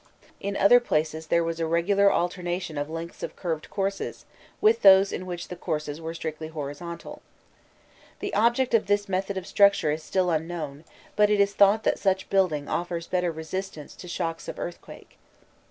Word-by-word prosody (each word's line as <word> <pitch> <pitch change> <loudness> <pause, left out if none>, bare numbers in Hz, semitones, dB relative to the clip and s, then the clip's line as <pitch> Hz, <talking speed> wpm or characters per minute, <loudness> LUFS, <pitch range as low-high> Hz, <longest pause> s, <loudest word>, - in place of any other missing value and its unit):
In 200 0 -3
other 245 +5 +7
places 160 -7 -1
there 170 +2 +2
was 165 0 -3
a 165 - 0
regular 195 +5 +3
alternation 175 -1 -2
of 145 +1 -3
lengths 165 +1 -7
of - - -5
curved 165 -4 -4
courses, 195 0 -3 0.3
with 435 +2 +4
those 195 0 +7
in 185 - -5
which 175 -1 -6
the 180 - -5
courses 150 -3 -4
were 165 +1 -5
strictly 155 -1 -5
horizontal. 160 +2 -7 1.0
The - - -4
object 235 +4 +2
of 220 -4 +3
this 205 0 +1
method 195 +1 -2
of 185 - -4
structure 200 -7 +4
is 155 +2 -3
still 180 +2 0
unknown, 160 -2 -4 0.3
but 210 0 +4
it 210 -1 +2
is 200 0 +3
thought 205 +2 +4
that - - +1
such 190 -1 0
building 170 -7 +1
offers 170 -1 -3
better 180 -1 0
resistance 160 0 -6
to 180 - -10
shocks 165 -2 -4
of - - -6
earthquake. 175 - -9
175 Hz, 175 wpm, -26 LUFS, 160-195 Hz, 1.0 s, other